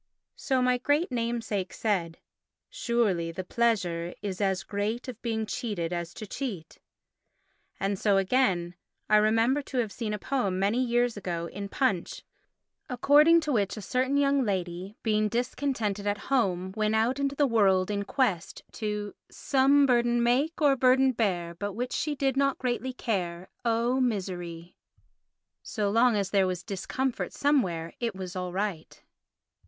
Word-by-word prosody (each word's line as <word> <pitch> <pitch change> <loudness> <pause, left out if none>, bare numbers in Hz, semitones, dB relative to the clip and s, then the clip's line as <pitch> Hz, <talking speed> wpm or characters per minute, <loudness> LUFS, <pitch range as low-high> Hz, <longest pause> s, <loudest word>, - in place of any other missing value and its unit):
So 260 -2 0
my 250 0 +2
great 290 +5 +1
namesake 230 -5 -2
said, 175 -7 -1 0.5
"Surely 230 - 0
the 185 +3 -5
pleasure 180 -6 0
is 195 -1 -4
as 190 -2 0
great 210 +5 -3
Of 240 -3 -8
being 220 -2 -2
cheated 205 -8 -3
as 170 -1 -3
to 215 - -7
cheat"; 195 - -6 1.0
and 195 0 -1
so, 205 -2 +3
again, 190 -4 +1 0.4
I 215 - +7
remember 225 +6 +3
to 275 -2 -6
have 230 -4 0
seen 225 -1 -4
a 210 - -2
poem 205 -4 -1
many 205 +7 +1
years 240 -1 +1
ago 175 -4 -3
in 200 +3 -6
Punch 200 -8 -1 0.7
according 295 +6 +5
to 305 -2 -2
which 210 -4 0
a - - -5
certain 260 +5 0
young 280 -1 +3
lady, 185 -1 -3
being 215 -1 +1
discontented 230 -4 -2
at 205 0 +1 0.2
home, 190 -7 +1
went 215 0 +1
out 235 +5 +1
into 280 0 -1
the 290 - +3
world 200 -6 +3
in 200 -1 -1
quest 200 - -1
to 210 -1 -4 0.2
"Some 275 +1 +3
burden 240 -2 +2
make 265 +7 +1
or 280 -2 +5
burden 260 +1 +4
bear, 185 -8 -1
But 205 +3 -5
which 245 +4 -3
she 300 -1 -1
did 270 -2 0
not 275 0 +2
greatly 255 +1 -2
care—Oh 225 +4 -1
Miseree!" 180 -7 -3 0.9
So 205 -3 -2
long 235 +1 +4
as 200 -2 -1
there 195 -2 +3
was 180 -2 -3
discomfort 235 +7 -3
somewhere 180 - 0
it 230 -4 -2
was 190 0 -6
all 180 -1 -3
right. 190 -3 -4
215 Hz, 155 wpm, -28 LUFS, 190-255 Hz, 1.0 s, I